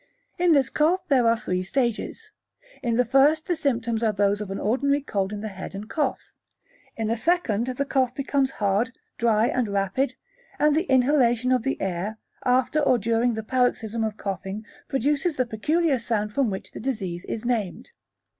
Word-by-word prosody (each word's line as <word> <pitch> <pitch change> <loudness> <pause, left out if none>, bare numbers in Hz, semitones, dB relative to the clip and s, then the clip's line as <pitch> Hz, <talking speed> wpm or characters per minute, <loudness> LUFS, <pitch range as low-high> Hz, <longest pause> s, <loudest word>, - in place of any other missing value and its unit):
In 350 -2 +5
this 280 -3 +3
cough 340 +5 +1
there 255 -5 +4
are 230 0 +4
three 185 -4 -2
stages. 235 +4 -2 0.5
In 235 -2 0
the 250 +1 +3
first 285 +6 +4
the 350 - 0
symptoms 235 -7 -1
are 225 -2 +2
those 205 0 +1
of 205 - -5
an 195 - -3
ordinary 280 +6 +1
cold 195 -7 -1
in 205 -1 -5
the 215 - -4
head 190 0 -8
and 205 +2 -6
cough. 290 +1 -1 0.8
In 225 - -1
the 230 - +1
second 240 - +1
the 260 +2 -2
cough 260 -2 +1
becomes 275 -1 +1
hard, 205 +5 +1 0.3
dry 225 -2 +3
and 245 -1 0
rapid, 200 +7 0 0.4
and 300 0 +3
the 330 +4 0
inhalation 255 -2 +3
of 255 -2 +3
the 270 +4 -2
air, 195 +3 -3 0.3
after 255 +4 +2
or 270 -4 +3
during 230 +2 +1
the 220 - -4
paroxysm 230 -2 0
of 215 -1 -2
coughing 195 +2 -5 0.2
produces 290 +4 0
the 255 - +2
peculiar 290 +6 +1
sound 215 -2 -2
from 270 -2 +2
which 190 -1 -6
the - - -8
disease 200 -8 -3
is 225 +1 -5
named. 230 - -2
235 Hz, 185 wpm, -25 LUFS, 210-275 Hz, 0.8 s, In